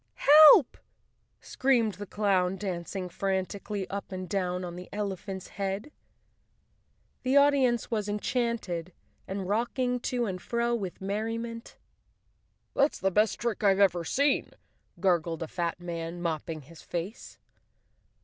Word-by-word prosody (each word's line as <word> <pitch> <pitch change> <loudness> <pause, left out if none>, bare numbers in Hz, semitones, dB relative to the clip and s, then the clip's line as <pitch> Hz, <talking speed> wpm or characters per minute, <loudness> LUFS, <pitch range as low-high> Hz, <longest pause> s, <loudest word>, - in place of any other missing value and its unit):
"Help!" 300 -1 +8 0.6
screamed 240 -5 +1
the 205 +1 -8
clown, 190 -3 +1
dancing 185 -1 -4
frantically 195 +2 -3
up 200 0 -5
and 185 -1 -5
down 180 -2 -1
on 175 -1 -7
the 180 0 -9
elephant's 195 -2 -5
head. 200 +7 -4 1.3
The 260 +2 +2
audience 275 -5 +3
was 210 -2 -1
enchanted 210 -6 -2 0.3
and 190 -1 -4
rocking 245 +4 0
to 245 0 -1
and 185 -4 -4
fro 235 +3 0
with 195 -7 -4
merriment. 225 +4 -4 0.5
" - - -44
That's 280 +2 +2
the 195 - 0
best 210 +3 +2
trick 235 -2 -2
I've 195 -1 +4
ever 180 -4 +3
seen," 280 - +1 0.5
gurgled 170 -3 +1
a - - -5
fat 170 +1 -3
man, 170 -1 -5
mopping 160 -2 -3
his 160 +4 -15
face. 180 +7 -6
200 Hz, 130 wpm, -28 LUFS, 180-235 Hz, 1.3 s, Help